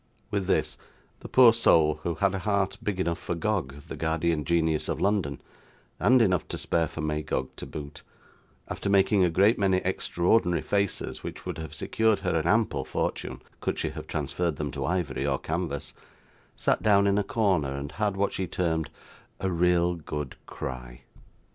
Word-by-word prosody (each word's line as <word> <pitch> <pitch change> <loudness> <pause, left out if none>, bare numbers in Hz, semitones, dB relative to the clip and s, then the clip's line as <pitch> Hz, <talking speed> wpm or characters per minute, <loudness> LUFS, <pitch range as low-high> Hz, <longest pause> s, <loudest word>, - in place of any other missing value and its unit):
With 100 -2 -1
this, - - 0 0.4
the - - -9
poor 125 -3 +7
soul, 80 -9 +4
who 85 - -2
had 100 +4 +1
a 95 - -2
heart 100 0 0
big 100 -3 -2
enough 85 -2 0
for 85 - -3
Gog, 85 -7 -2
the - - -6
guardian 80 -1 0
genius 80 -2 +1
of - - -1
London, 95 -9 0 0.6
and 125 -1 +5
enough 95 -5 +1
to - - -4
spare 85 -1 +1
for 80 - -6
Magog 75 -4 -2
to - - -7
boot, 70 -1 -8 0.7
after - - -3
making 100 0 +4
a 90 - +4
great 100 +7 +3
many 95 -2 +3
extraordinary 90 -1 +1
faces 100 -2 -1
which - - -7
would - - -4
have 80 -3 -7
secured 110 -2 +1
her 90 -3 0
an 80 0 0
ample 110 +4 +2
fortune, - - -3 0.2
could - - -2
she - - -1
have - - -8
transferred 85 -3 -2
them 75 -1 -3
to 70 -1 -3
ivory 80 -6 -1
or 70 -1 +1
canvas, 80 -1 -3 0.6
sat - - +1
down 100 -2 +4
in 100 0 +3
a - - +1
corner, 95 -11 +1
and 70 0 -5
had 105 -2 -1
what 100 0 +1
she 95 - -2
termed 80 -3 -1 0.5
'a 95 - -1
real 90 0 +3
good 75 -4 -5
cry. 60 -2 -7
85 Hz, 180 wpm, -27 LUFS, 75-100 Hz, 0.7 s, poor